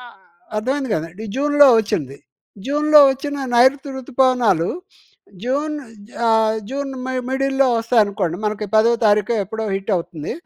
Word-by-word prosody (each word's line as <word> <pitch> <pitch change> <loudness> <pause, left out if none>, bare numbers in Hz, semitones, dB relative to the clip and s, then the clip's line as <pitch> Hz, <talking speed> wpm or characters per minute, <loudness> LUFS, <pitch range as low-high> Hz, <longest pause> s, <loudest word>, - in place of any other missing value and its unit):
ఆ! 245 - -12 0.5
అర్థమైంది 265 +3 -2
కదా! 160 +1 -5
డి 220 - -6
జూన్‌లో 290 0 +5
ఒచ్చింది. 140 -10 -4 0.5
జూన్‌లో 300 +2 +4
ఒచ్చిన 280 +1 -5
నైరుతి 270 +3 +3
ఋతుపవనాలు, 250 - +1 0.7
జూన్ 290 +4 -2 0.3
జ - - -20 0.2
ఆహ్, 220 0 +2
జూన్ 275 0 -4 0.2
మ - - -5 0.2
మిడిల్‌లో 270 0 +1
వస్తాయనుకోండి. 205 -7 0
మనకి 210 0 -3
పదో 225 +2 +4
తారీఖో, 210 +3 +2
ఎప్పుడో 220 +2 -5
హిట్టవుతుంది, 175 -5 -4
240 Hz, 125 wpm, -19 LUFS, 210-275 Hz, 0.7 s, జూన్‌లో